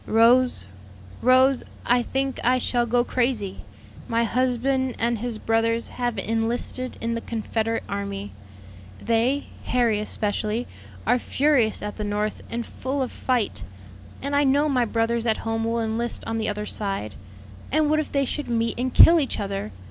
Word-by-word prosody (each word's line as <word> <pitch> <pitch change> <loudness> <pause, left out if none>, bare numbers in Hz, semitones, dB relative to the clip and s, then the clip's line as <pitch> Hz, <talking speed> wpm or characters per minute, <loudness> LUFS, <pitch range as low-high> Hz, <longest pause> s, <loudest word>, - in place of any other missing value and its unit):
"Rose, 245 +3 +5 0.6
Rose, 260 +1 +4 0.2
I 245 0 +4
think 270 +2 -2
I 250 +1 +4
shall 240 -1 0
go 240 +1 +2
crazy! 240 -6 -1 0.5
my 230 0 +1
husband 255 +2 0
and 235 -1 0
his 235 -1 -4
brothers 225 +1 0
have 240 -2 -2
enlisted 225 +4 -2
in 230 0 -2
the 230 - -3
Confederate 225 0 -2
army. 100 0 -4 0.7
They, 235 +5 +1 0.2
Harry 235 -4 +2
especially, 215 +2 -2 0.4
are 250 - +3
furious 265 -6 +1
at 210 0 -5
the 215 - -3
North 210 +1 -2
and 235 0 -3
full 265 +1 -3
of 255 - -4
fight; 235 - -1 0.6
and 280 +1 -1
I 285 - +4
know 285 +2 +3
my 255 -4 +2
brothers 230 +1 0
at 220 - +2
home 225 0 -1
will 230 +1 0
enlist 225 +2 -2
on 225 0 -2
the 220 - 0
other 210 0 -3
side; 195 - -3 0.6
and 310 +1 +3
what 310 +1 +2
if 310 - -3
they 280 -1 +1
should 295 +3 -3
meet 230 0 0
and 255 +1 -1
kill 335 +6 +8
each 280 - -1
other! 195 - -3
235 Hz, 165 wpm, -24 LUFS, 220-255 Hz, 0.7 s, kill